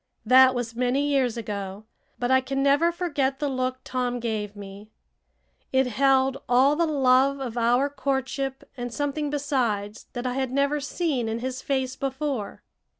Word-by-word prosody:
That 260 +2 +7
was 235 -2 -3
many 250 +4 +1
years 265 -5 +1
ago, 200 -2 -5 0.3
but 245 +1 -1
I 260 0 +5
can 270 +1 -2
never 290 +5 +4
forget 290 -7 -1
the 290 - -1
look 255 -1 -1
Tom 245 -1 -2
gave 215 -3 -3
me. 200 +1 -10 0.8
It 265 0 +3
held 265 +2 +2
all 260 +4 +5
the 335 +1 +1
love 275 -1 +3
of 250 -4 -5
our 245 +3 +3
courtship 270 -1 -3
and 245 -1 -5
something 290 +3 -2
besides 245 -8 -2
that 245 0 -5
I 250 - -1
had 265 0 -1
never 280 +2 +1
seen 285 -5 -1
in 220 - -2
his 260 +2 -4
face 265 -2 -1
before. 270 -5 -3
260 Hz, 160 wpm, -25 LUFS, 245-275 Hz, 0.8 s, That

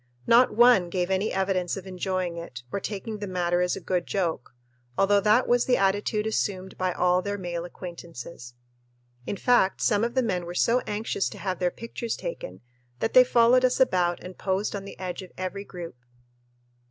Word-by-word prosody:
Not 240 +2 +5
one 235 -6 +6
gave 180 +1 -1
any 190 +3 +1
evidence 190 -1 0
of 195 - -8
enjoying 185 -1 -2
it 145 -8 -8
or - - -1
taking 210 +2 -5
the 205 - -4
matter 175 -1 0
as 180 0 +1
a - - -6
good 180 -2 -2
joke, 165 -10 -2 0.4
although 200 +1 +4
that 215 +5 +3
was 245 0 +3
the 250 - +3
attitude 205 +2 +1
assumed 190 -3 -2
by 185 0 -1
all 180 +1 +2
their 205 +1 -3
male 175 -2 -4
acquaintances. 170 -8 -9 0.7
In 200 - -3
fact, 240 -6 +3
some 210 -1 +2
of 235 +2 -1
the 260 - +3
men 180 -6 -2
were 175 - -6
so 235 +6 +3
anxious 210 -1 -1
to - - -10
have 185 -3 -3
their 180 - +2
pictures 230 +2 -5
taken - - -6 0.4
that 225 - -2
they 255 - +9
followed 245 +1 +4
us 255 0 +2
about 180 -9 +2
and 180 0 -8
posed 195 +2 -1
on 195 -1 -5
the 200 - -10
edge 185 0 -5
of 185 - -11
every 185 +2 -4
group. 175 -6 -8
190 Hz, 190 wpm, -26 LUFS, 180-215 Hz, 0.7 s, they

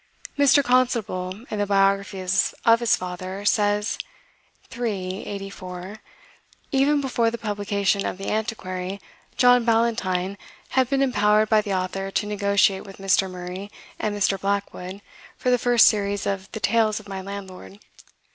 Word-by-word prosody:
Mr. 285 0 +5
Constable, 230 -6 0
in 210 - -2
the 205 - 0
biography 195 -1 +2 0.4
of 230 0 +6
his 235 -1 +3
father, 185 +2 -6
says 205 0 +1 0.8
(iii. 195 -6 -3
84): 195 -1 -7 0.7
"Even 285 +1 +3
before 240 -4 +1
the 235 - -5
publication 205 -2 -1
of - - -3
'The 195 - -6
Antiquary,' 195 -4 -3 0.4
John 245 -1 +5
Ballantyne 215 -5 0 0.3
had 260 -2 +2
been 275 -1 +1
impowered 210 -4 +3
by 215 -1 +5
the 200 -2 -2
Author 190 +1 -2
to 200 - -1
negotiate 200 -1 +2
with 195 - -12
Mr. 195 0 +2
Murray 180 +2 -7 0.3
and 210 -1 -2
Mr. 195 -1 +1
Blackwood 200 -1 -3 0.4
for 250 - 0
the 245 - +3
first 240 -1 +5
series 205 -2 +1
of 195 -1 -3
the 220 - -4
'Tales 220 0 +2
of 210 - -15
my 195 -1 -5
Landlord. 195 0 -9
200 Hz, 145 wpm, -24 LUFS, 195-225 Hz, 0.8 s, of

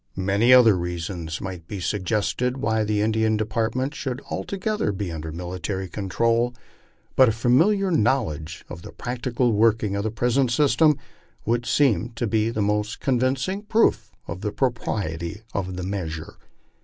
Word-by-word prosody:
Many 100 +6 +2
other 120 -5 +8
reasons 85 -2 -4
might 90 -4 -6
be 100 - -5
suggested 105 +7 -1
why 110 -5 +1
the 105 -1 0
Indian 110 0 +2
department 115 +5 -1
should 130 -4 -4
altogether 200 - -2
be 95 -2 -4
under 80 0 -5
military 90 +3 -4
control, 115 +6 0 0.6
but 130 -3 +6
a - - +3
familiar 165 - +3
knowledge 105 - 0
of 85 - -9
the - - -10
practical 120 0 -1
working 110 -1 +2
of 100 - 0
the 110 - 0
present 120 +4 +1
system 150 +3 +4 0.5
would 120 +2 0
seem 120 - +2
to 120 - -1
be 110 0 +1
the 110 -2 -1
most 105 +1 -1
convincing 130 +8 0
proof 220 +2 +2 0.2
of 95 - -6
the 105 - -2
pro 130 +3 +1
priety 100 -3 -4
of 95 -2 -3
the 90 - -4
measure. 85 -5 -4
110 Hz, 155 wpm, -24 LUFS, 95-125 Hz, 0.6 s, other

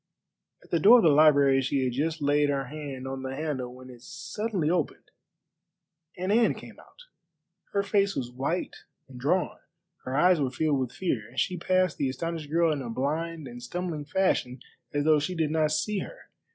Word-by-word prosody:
At - - -21
the 170 - +2
door 220 +9 +8
of 230 - +3
the 165 - +6
library 140 -2 +5
she 135 +1 0
had 125 -2 -1
just 155 +3 -2
laid 145 +1 +3
her 140 -1 -1
hand 140 -2 -7
on 135 0 -5
the 130 0 -5
handle 140 -5 -3
when 130 0 -12
it 120 -1 -14
suddenly 190 - -3
opened, 170 -2 -2 1.1
and 185 +2 -2
Anne 230 +2 +3
came - - -12
out. - - -18 0.7
Her 200 - +1
face 200 -1 +1
was 125 -2 -3
white 135 +8 -2 0.3
and 125 -2 -11
drawn, 175 +8 0 0.5
her 130 +1 -2
eyes 175 0 +4
were 135 - +1
filled 145 +2 0
with 130 -2 -2
fear, 125 - -2
and 130 - -5
she 180 - 0
passed 185 0 +1
the 135 - +1
astonished 165 +2 -4
girl 165 +1 +3
in 145 - -4
a 120 - -6
blind 155 +5 -3
and 120 0 -9
stumbling 170 -1 -4
fashion 140 -7 0 0.3
as 145 0 -1
though 155 -1 +5
she 165 +5 -3
did 160 -3 0
not 155 -1 +2
see 205 +6 0
her. - - -7
150 Hz, 195 wpm, -27 LUFS, 135-175 Hz, 1.1 s, door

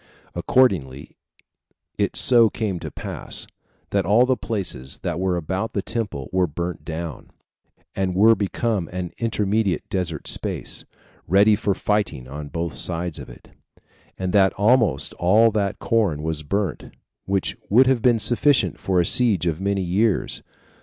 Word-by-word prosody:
Accordingly, 75 - +1 0.8
it - - -1
so 120 -3 +4
came 105 -6 -3
to - - -6
pass, - - -6 0.5
that 100 -1 +1
all 105 +7 +4
the 130 0 +2
places 95 - -3
that 85 -2 -2
were 95 -1 0
about 95 +6 -3
the 100 - -2
temple 105 - -3
were 95 -1 +2
burnt 85 +4 -5
down, 80 -3 -6 0.7
and 95 -2 -1
were 110 +4 +6
become 105 -2 -1
an 90 -1 -5
intermediate 105 -3 0
desert 90 -5 -3
space, - - +1 0.4
ready 100 +4 +5
for 100 -1 -1
fighting 100 -12 -1
on 75 +3 -7
both 85 0 -4
sides 85 -1 -2
of - - -9
it; - - -15 0.7
and 95 -1 -3
that 95 -2 +4
almost 105 - +2
all 110 +6 +4
that 100 -2 -1
corn 100 -11 0
was 80 -1 -3
burnt, 100 +5 -3 0.4
which 95 -1 -1
would 125 +6 +6
have 130 -2 +2
been 120 0 +4
sufficient 120 +6 +2
for 95 -2 0
a 85 - +2
siege 110 -8 +3
of 85 0 -1
many 100 -1 0
years. 100 +4 0
95 Hz, 150 wpm, -22 LUFS, 85-110 Hz, 0.8 s, were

